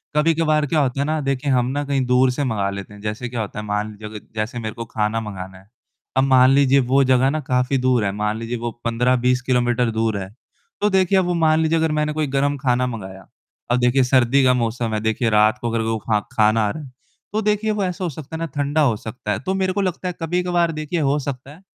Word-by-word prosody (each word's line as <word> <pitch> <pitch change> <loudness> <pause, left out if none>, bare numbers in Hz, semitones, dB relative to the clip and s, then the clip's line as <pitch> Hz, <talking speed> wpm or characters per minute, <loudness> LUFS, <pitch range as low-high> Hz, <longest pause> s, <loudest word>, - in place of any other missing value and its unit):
कभी-कभार 155 -1 +2
क्या 155 +2 +1
होता 135 -1 0
है - - 0
ना 155 +1 -1
देखिए 135 0 -1
हम 125 -1 +2
ना 145 +1 -2
कहीं 135 -2 0
दूर 125 +1 +3
से 145 +3 -2
मँगा 105 -6 -1
लेते 100 +1 -7
हैं। 105 - -13
जैसे 105 +3 -4
क्या 120 -2 -3
होता 105 0 -5
है 105 - -6
मान 105 +1 -2
लीजिए 105 0 -9 0.2
जैसे 110 +2 -3
मेरे 110 -2 -4
को 115 - -6
खाना 110 0 -1
मँगाना 95 -3 -7
है, 95 +2 -20 0.5
अब 130 - +5
मान 130 -1 +5
लीजिए 140 0 +4
वो 135 +1 +5
जगह 130 0 +3
ना 155 - -1
काफ़ी 125 0 +1
दूर 125 -4 +2
है, 100 - 0
मान 105 +2 -2
लीजिए 115 +1 -4
वो 120 0 -4
15-20 125 +2 +2
किलोमीटर 120 -2 +1
दूर 110 -1 0
है। 95 -1 -5 0.5
तो 210 - +3
देखिए 190 -1 +3
अब 185 - +1
वो 175 - 0
मान 160 -2 +3
लीजिए 160 +1 +2
अगर 160 -1 +1
मैंने 150 0 0
कोई 155 -1 -1
गरम 140 +1 0
खाना 125 -1 +1
मँगाया, 95 -5 -8 0.4
अब 125 - +3
देखिए 125 +2 +3
सर्दी 130 +1 +3
का 130 - +5
मौसम 115 -2 -1
है, 110 - 0
देखिए 110 +2 0
रात 105 0 +3
को 120 - -1
अगर 115 0 -1
वो 115 0 -1
खा 105 - +3
खाना 110 +1 +3
आ - - -1
रहा 155 - -7
है। 130 - -12 0.4
तो 215 - 0
देखिए 210 +1 +1
वो 210 -2 -1
ऐसा 180 0 -3
हो 175 - -1
सकता 155 +2 -8
है 160 - -5
ना 165 - -2
ठंडा 145 +2 +1
हो 125 -7 +3
सकता 110 0 -6
है, 105 - -1
तो 190 - -2
मेरे 190 -1 0
को 200 - 0
लगता 185 -1 -2
है 180 - -2
कभी-कभार 175 0 0
देखिए 155 +2 -3
हो 140 -1 +1
सकता 135 -1 -6
है। 160 +6 -15
125 Hz, 255 wpm, -21 LUFS, 110-150 Hz, 0.5 s, अब